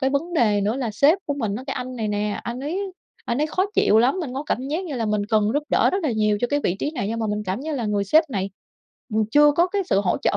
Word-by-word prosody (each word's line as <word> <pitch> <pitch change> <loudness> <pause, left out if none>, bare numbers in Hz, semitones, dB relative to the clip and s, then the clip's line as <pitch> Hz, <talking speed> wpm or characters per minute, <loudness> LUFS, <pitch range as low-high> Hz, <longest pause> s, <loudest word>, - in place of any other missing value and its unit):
cái 265 0 +1
vấn 330 +5 -2
đề 210 -9 +3
nữa 210 +4 0
là 250 -4 -2
sếp 285 - +4
của 285 - -1
mình 220 -7 -2
á 255 - -7
cái 270 - -3
anh 250 0 -5
này 220 -2 -2
nè, 205 0 -2
anh 240 +2 -5
ấy 370 +7 -3 0.3
anh 235 +3 -1
ấy 305 - +2
khó 370 +5 0
chịu 215 - +4
lắm, 245 +7 +4
mình 270 -7 -5
có 275 - -3
cảm 260 +2 -2
giác 325 +6 -2
như 315 -6 -5
là 225 -2 -1
mình 210 -1 0
cần 215 -1 +2
giúp 295 - +1
đỡ - - +3
rất 385 +1 -1
là 300 - 0
nhiều 215 -1 +1
cho 245 - +2
cái 290 +2 0
vị 180 - +1
trí - - -1
này, 295 -10 -3
nhưng 230 +1 -2
mà 220 - 0
mình 210 0 -2
cảm 190 +5 -3
như 315 +2 -4
là 245 - -2
người 205 -1 0
sếp 310 - +3
này, 195 -4 -2 0.6
ừm, 220 0 +2
chưa 295 +3 +6
có 340 +4 +3
cái 395 +2 -1
sự 200 - +2
hỗ 185 -3 +1
trợ - - +2
250 Hz, 315 wpm, -23 LUFS, 210-295 Hz, 0.6 s, chưa